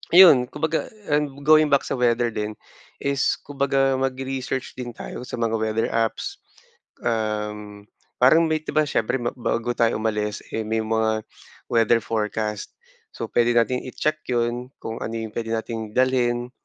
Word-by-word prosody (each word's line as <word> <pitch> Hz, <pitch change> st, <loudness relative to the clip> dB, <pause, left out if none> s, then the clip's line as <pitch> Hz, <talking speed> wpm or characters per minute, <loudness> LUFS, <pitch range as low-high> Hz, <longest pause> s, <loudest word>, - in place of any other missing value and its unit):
iyon 175 Hz, -9 st, +9 dB
kumbaga 160 Hz, +2 st, -2 dB, 0.2 s
and 150 Hz, -1 st, +1 dB, 0.2 s
going 155 Hz, -1 st, +6 dB
back 140 Hz, -, +3 dB
sa -, -, -1 dB
weather 120 Hz, -1 st, +2 dB
din, 105 Hz, -1 st, -3 dB, 0.5 s
is 140 Hz, -1 st, 0 dB
kumbaga 135 Hz, -1 st, +1 dB
mag-research 130 Hz, 0 st, -3 dB
din 125 Hz, -1 st, -5 dB
tayo 120 Hz, -, -8 dB
sa 125 Hz, -, -6 dB
mga 115 Hz, -1 st, +1 dB
weather 110 Hz, 0 st, 0 dB
apps. 115 Hz, -1 st, -1 dB, 0.6 s
Um, 105 Hz, -2 st, -3 dB, 0.3 s
parang 145 Hz, +7 st, +6 dB
may 155 Hz, -1 st, +1 dB
di 155 Hz, -, -7 dB
ba 155 Hz, -, +5 dB
siyempre 135 Hz, -4 st, 0 dB
ma 120 Hz, -, 0 dB
bago 120 Hz, -1 st, -1 dB
tayo 115 Hz, 0 st, +3 dB
umalis 105 Hz, -1 st, -1 dB
eh 110 Hz, -1 st, -3 dB
may 110 Hz, 0 st, 0 dB
mga 110 Hz, 0 st, 0 dB, 0.5 s
weather 115 Hz, 0 st, +4 dB
forecast. 105 Hz, -1 st, -2 dB, 0.4 s
So -, -, -5 dB
pwede 120 Hz, 0 st, +3 dB
nating 125 Hz, +2 st, +1 dB
i-check 155 Hz, +4 st, -1 dB
yun 120 Hz, +1 st, -1 dB
kung 110 Hz, 0 st, -4 dB
ano 115 Hz, -, -4 dB
yung 110 Hz, -1 st, -4 dB
puwede 115 Hz, -1 st, -2 dB
nating 110 Hz, -1 st, -5 dB
dalhin. 125 Hz, -1 st, +1 dB
120 Hz, 155 wpm, -23 LUFS, 110-135 Hz, 0.6 s, iyon